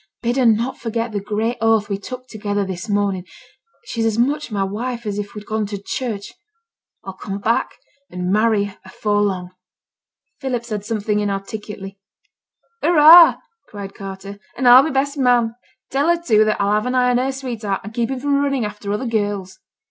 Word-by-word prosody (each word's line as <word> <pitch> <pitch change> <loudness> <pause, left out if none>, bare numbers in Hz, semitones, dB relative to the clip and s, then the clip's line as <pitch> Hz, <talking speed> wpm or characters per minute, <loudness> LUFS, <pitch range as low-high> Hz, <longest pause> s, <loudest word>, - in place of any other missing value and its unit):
Bid 240 +2 0
her 255 -3 +4
not 230 +4 +1
forget 230 0 -3
the 205 - -2
great 215 +4 -2
oath 225 -2 +3
we 200 -1 -3
took 255 +4 -8
together 205 -3 -2
this 190 +2 -6
morning; 200 -3 0 0.6
she's 230 - -3
as 220 -1 -1
much 280 +3 0
my 200 -2 0
wife 235 +4 -4
as 205 -1 -2
if 205 0 -6
we'd 210 0 -8
gone 215 -1 -2
to 205 0 -5
church; 200 0 -5 0.7
I'll 190 - -7
come 195 +1 -6
back 225 +3 0 0.3
and 180 0 -3
marry 215 0 +3
her 200 -1 -8
afore 205 +2 -1
long.' 185 -3 -1 0.9
Philip 255 -4 -3
said 210 -3 -4
something 210 -1 -1
inarticulately. 200 -1 -5 0.8
'Hurra!' 330 +1 +8 0.2
cried 200 -2 -8
Carter, 195 +1 -8 0.2
'and 255 0 +1
I'll 245 +2 +10
be 310 - -1
best 280 +1 -1
man. 245 -3 +3 0.4
Tell 280 +3 +1
her, 345 0 +3
too 215 -10 +3
that 215 -1 0
I'll 200 0 +1
have 215 +3 +1
an 250 - -1
eye 250 0 +3
on 245 - +2
her 265 +2 0
sweetheart, 235 -7 -4
and 215 +2 -9
keep 235 0 -1
him 265 -1 -3
from 280 +1 +1
running 275 -5 0
after 210 -1 -5
other 210 +5 -2
girls.' 205 -4 -2
215 Hz, 185 wpm, -20 LUFS, 200-250 Hz, 0.9 s, I'll